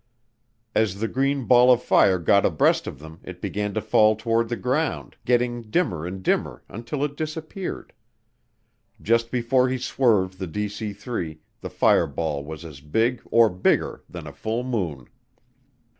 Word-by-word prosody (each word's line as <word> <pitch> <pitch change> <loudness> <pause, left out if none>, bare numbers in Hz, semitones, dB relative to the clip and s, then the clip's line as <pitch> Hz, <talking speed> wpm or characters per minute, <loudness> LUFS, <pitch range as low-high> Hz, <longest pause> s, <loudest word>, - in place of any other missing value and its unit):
As 100 -3 +1
the 115 - 0
green 135 +1 0
ball 125 +1 +6
of 125 -1 +3
fire 95 -1 +4
got 100 +4 +3
abreast 80 - +2
of - - -6
them 80 +3 -12
it 90 -1 -9
began 105 +2 -3
to 110 - 0
fall 110 +1 +4
toward 115 +1 0
the 120 - -1
ground, 135 +7 -2
getting 120 0 +1
dimmer 90 - 0
and 95 +1 -7
dimmer - - -1
until 120 +6 -4
it 145 -1 -2
disappeared. 160 +4 -5 1.1
Just 115 +2 +1
before 125 +1 +2
he 130 - -1
swerved 105 -8 +1
the 95 - -4
DC 105 +3 -4
3, 90 -8 -5 0.2
the - - -7
fireball 75 -4 +1
was 80 +2 -8
as 75 -4 -10
big, 115 - 0
or 115 -1 +6
bigger, 90 -2 0
than - - -8
a - - -9
full 115 +3 -3
moon. 90 - -3
110 Hz, 160 wpm, -24 LUFS, 90-125 Hz, 1.1 s, ball